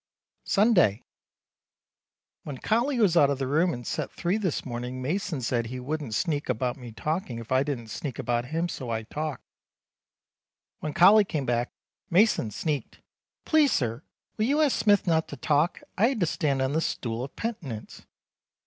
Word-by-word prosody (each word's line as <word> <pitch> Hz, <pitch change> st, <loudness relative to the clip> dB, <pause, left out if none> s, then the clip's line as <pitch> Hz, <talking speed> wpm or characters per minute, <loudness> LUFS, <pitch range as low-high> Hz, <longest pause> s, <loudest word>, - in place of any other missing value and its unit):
Sunday. 195 Hz, -, +4 dB, 1.4 s
When 145 Hz, -3 st, -7 dB
Colly 240 Hz, -, +1 dB
was 200 Hz, -7 st, +3 dB
out 145 Hz, -4 st, +6 dB
of 140 Hz, -, 0 dB
the 135 Hz, -, -2 dB
room 160 Hz, +7 st, +2 dB
in 120 Hz, -5 st, -5 dB
Set -, -, -3 dB
3 175 Hz, +3 st, -1 dB
this 190 Hz, -8 st, -2 dB
morning 125 Hz, 0 st, -5 dB
Mason 160 Hz, +2 st, -2 dB
said 120 Hz, -1 st, -1 dB
he 130 Hz, +2 st, -6 dB
wouldn't 140 Hz, -3 st, -3 dB
sneak 150 Hz, -1 st, -1 dB
about 125 Hz, 0 st, 0 dB
me 125 Hz, -3 st, -10 dB
talking 135 Hz, -, -3 dB
if 115 Hz, 0 st, -9 dB
I 130 Hz, 0 st, +4 dB
didn't 135 Hz, -6 st, -3 dB
sneak 135 Hz, +2 st, -5 dB
about 120 Hz, 0 st, -1 dB
him 165 Hz, +6 st, -1 dB
so 130 Hz, -7 st, -6 dB
I 110 Hz, -1 st, -2 dB
talked. 150 Hz, +5 st, -5 dB, 1.4 s
When 150 Hz, -1 st, -5 dB
Colly 205 Hz, +4 st, +7 dB
came 155 Hz, -8 st, -3 dB
back 120 Hz, 0 st, 0 dB, 0.4 s
Mason 185 Hz, -, +3 dB
sneaked, 145 Hz, +6 st, -3 dB, 0.5 s
Please 310 Hz, -3 st, +4 dB
sir 115 Hz, -3 st, -1 dB, 0.4 s
will 215 Hz, -, +1 dB
you 285 Hz, +5 st, +2 dB
ask 300 Hz, -4 st, +3 dB
Smith 205 Hz, -1 st, +3 dB
not 160 Hz, -2 st, +2 dB
to 145 Hz, -, -8 dB
talk. 150 Hz, +6 st, +1 dB, 0.2 s
I 220 Hz, -, +6 dB
had 260 Hz, -3 st, -1 dB
to -, -, +4 dB
stand 140 Hz, -4 st, 0 dB
on 130 Hz, +2 st, -1 dB
the 160 Hz, -, +1 dB
stool 115 Hz, -6 st, -2 dB
of 135 Hz, -, -8 dB
penitence. 145 Hz, -, -6 dB
145 Hz, 175 wpm, -27 LUFS, 125-180 Hz, 1.4 s, Colly